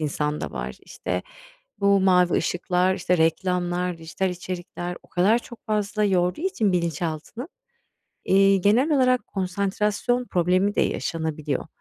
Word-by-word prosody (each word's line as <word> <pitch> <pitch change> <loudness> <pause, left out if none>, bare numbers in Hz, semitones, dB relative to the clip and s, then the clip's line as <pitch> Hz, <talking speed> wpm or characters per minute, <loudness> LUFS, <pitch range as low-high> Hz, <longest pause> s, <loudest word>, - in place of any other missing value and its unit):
insanda 150 0 -2
var. - - -5
İşte, - - -4 0.6
bu 200 -1 +4
mavi 180 -2 +4
ışıklar, 180 +1 +1
işte, 180 0 0
reklamlar, 175 +1 0
dijital 165 +4 -2
içerikler 180 0 -6
o - - -21
kadar 200 +6 +3
çok 235 -1 -13
fazla 210 0 0
yorduğu 180 - +1
için 345 - +1
bilinçaltını, 170 - -3 0.8
eee, 195 +1 +5
genel 220 - +3
olarak 255 -3 +3
konsantrasyon 205 +5 -1
problemi 185 +3 +1
de - - +2
yaşanabiliyor. 160 -3 -2
185 Hz, 120 wpm, -24 LUFS, 175-205 Hz, 0.8 s, eee